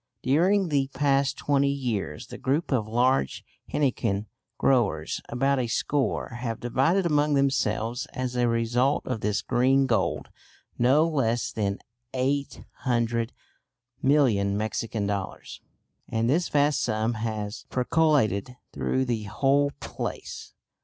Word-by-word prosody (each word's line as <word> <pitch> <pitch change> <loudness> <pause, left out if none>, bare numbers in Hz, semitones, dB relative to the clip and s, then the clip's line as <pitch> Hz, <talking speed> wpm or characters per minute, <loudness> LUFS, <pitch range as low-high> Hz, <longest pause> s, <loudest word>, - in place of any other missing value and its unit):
During 180 +8 +3
the 140 -3 +1
past 140 -1 +2
twenty 140 -1 +2
years 120 - -3
the - - -10
group 145 +6 0
of 115 -5 +1
large 120 - +1 0.3
henequen 115 -7 0 0.3
growers 100 - +1
about 135 +3 +1
a 125 - 0
score 135 +4 -1
have 115 -2 -3
divided 140 +10 +1
among 150 -2 +2
themselves 125 -3 0
as 130 -1 -3
a 120 -1 +2
result 120 +4 +1
of 125 -4 -3
this 105 0 0
"green 130 +2 +3
gold," 120 -4 0 0.5
no 135 +7 +4
less 120 -7 0
than 100 -2 -1 0.4
800,000,000 120 -2 -1
Mexican 110 0 -2
dollars. 100 -2 -4 0.5
And 115 0 0
this 160 +7 +1
vast 145 -1 +2
sum 110 0 0
has 110 -1 -4
percolated 125 - +1 0.2
through 130 0 0
the 115 -4 -2
whole 140 +7 +2
place. - - -6
125 Hz, 120 wpm, -26 LUFS, 115-140 Hz, 0.5 s, no